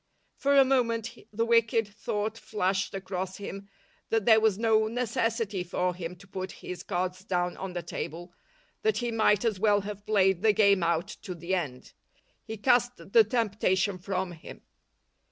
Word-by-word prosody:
For 280 0 +2
a 270 - +8
moment 235 -3 0 0.2
the 225 +2 0
wicked 230 -1 +3
thought 210 +1 -3
flashed 195 -4 -1
across 190 -1 -4
him 200 0 -8 0.4
that 225 -3 +1
there 220 -2 +7
was 220 -3 +2
no 220 -1 +3
necessity 225 -4 -1
for 180 +1 -1
him 175 0 -6
to 200 +3 -17
put 190 -1 -5
his 180 - -7
cards 185 +1 -3
down 180 -3 -1
on 190 -1 -5
the 175 -1 -4
table, 175 +1 -6 0.5
that 435 0 +1
he 240 -1 -1
might 220 -1 +3
as 215 -5 0
well 205 -1 +3
have 205 0 -8
played 190 -4 +3
the 220 -1 +4
game 200 -2 +4
out 170 0 0
to 185 -4 -6
the 170 +2 -4
end. 145 -9 -3 0.5
He 220 - -7
cast 245 +2 +3 0.2
the 460 -2 +8
temptation 200 - 0
from 185 0 -2
him. 165 -2 -11
200 Hz, 170 wpm, -28 LUFS, 185-225 Hz, 0.5 s, a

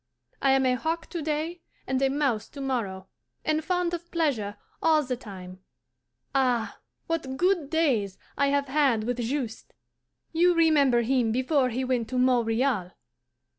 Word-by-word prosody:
I 270 -1 +4
am 270 0 +3
a 255 - +3
hawk 320 +6 -3
to 340 - -3
day 315 +3 -2 0.2
and 265 0 -1
a 270 - +3
mouse 270 -6 0
to 285 - -11
morrow, 225 -9 -2 0.4
and 310 0 +1
fond 355 +1 0
of 345 0 -5
pleasure 245 -12 -1 0.2
all 315 -2 +4
the 255 -2 -2
time. 185 -6 -10 0.7
Ah, 250 -4 +1 0.3
what 285 -6 -3
good 355 -4 +1
days 255 - +1 0.2
I 280 - +2
have 280 0 +1
had 265 -6 +2
with 245 +2 -2
Juste! 240 -1 -3 0.6
You 350 +2 +4
remember 285 -7 +4
him 240 -2 +2
before 260 +2 +2
he 250 +2 -2
went 250 -3 -1
to 255 - -2
Montreal? 240 -5 +1
265 Hz, 155 wpm, -27 LUFS, 235-310 Hz, 0.7 s, I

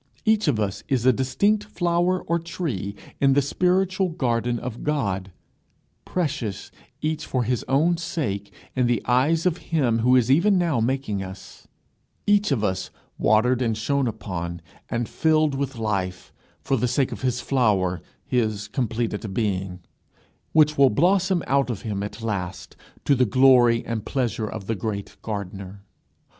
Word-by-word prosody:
Each 215 -4 +3
of 130 -7 +2
us 100 -3 -2
is 130 -4 +1
a 130 - +6
distinct 200 - +1
flower 175 -2 0
or 170 +1 0
tree 135 - -4 0.2
in 135 -1 +4
the 140 - +4
spiritual 185 +5 +1
garden 120 -7 0
of 120 -1 -6
God, 100 -11 -1 0.7
precious, 145 - -3 0.3
each 155 0 -1
for 130 -2 0
his 125 +1 -1
own 160 +6 +3
sake, 110 - -3 0.2
in 125 -2 +2
the 120 -1 0
eyes 145 +7 +2
of 180 -2 +2
him 130 -8 +2
who 125 +3 +4
is 125 0 +3
even 185 +8 +4
now 170 -8 +1
making 115 -4 -1
us, 95 0 -10 0.6
each 205 -4 +3
of 120 -6 +1
us 95 -2 -1 0.3
watered 125 +4 +3
and 115 -3 0
shone 140 +4 0
upon 85 -6 -5 0.3
and 120 -1 -1
filled 155 -2 +2
with 135 -1 -3
life, 95 -5 -3 0.3
for 135 - +1
the 125 - +1
sake 125 +2 +1
of 115 - -6
his 125 -1 0
flower, 105 - +1 0.2
his 110 -4 -1
completed 115 -3 -2
being, 95 -4 -2 0.7
which 150 -2 +4
will 135 -1 +7
blossom 180 - +2
out 140 -1 +1
of 110 -6 -4
him 105 -3 -3
at 105 +2 -6
last 95 -4 -4 0.3
to 145 - +4
the 130 -2 +3
glory 125 0 +5
and 115 -2 -3
pleasure 120 -5 -1
of 105 -2 -6
the 115 - -1
great 100 -1 -5
gardener. 100 -2 -6
125 Hz, 155 wpm, -24 LUFS, 105-150 Hz, 0.7 s, will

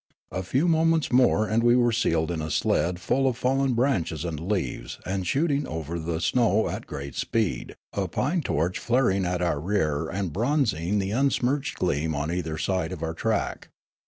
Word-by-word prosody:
A 90 - -2
few 130 - +1
moments 165 -1 +2
more 125 -4 +4
and 110 +4 +2
we 120 +1 +5
were 120 -1 +4
seated 85 -8 +1
in 80 -2 -2
a 80 - -4
sled 85 +3 +1
full 135 +8 +1
of 125 -3 0
fallen 135 0 +1
branches 95 - 0
and 80 -3 -3
leaves 90 -11 -2
and 95 -1 -2
shooting 145 - +1
over 80 +1 -4
the 80 0 -2
syow 110 +4 +2
at - - -5
great 70 -1 -6
speed, 105 - -1 0.2
a - - -1
pine - - 0
torch 85 +5 -1
flaring 115 -6 +2
at 90 0 -1
our 85 -4 0
rear 80 -4 0
and 95 -2 -3
bronzing 110 - +1
the 95 -1 -1
unsmirched 135 +2 +1
gleam 80 -2 0
on 75 +3 -2
either 80 -3 -2
side 90 -1 -1
of 85 -3 -5
our 80 0 -2
track. 110 +5 -2
95 Hz, 185 wpm, -26 LUFS, 80-125 Hz, 0.2 s, we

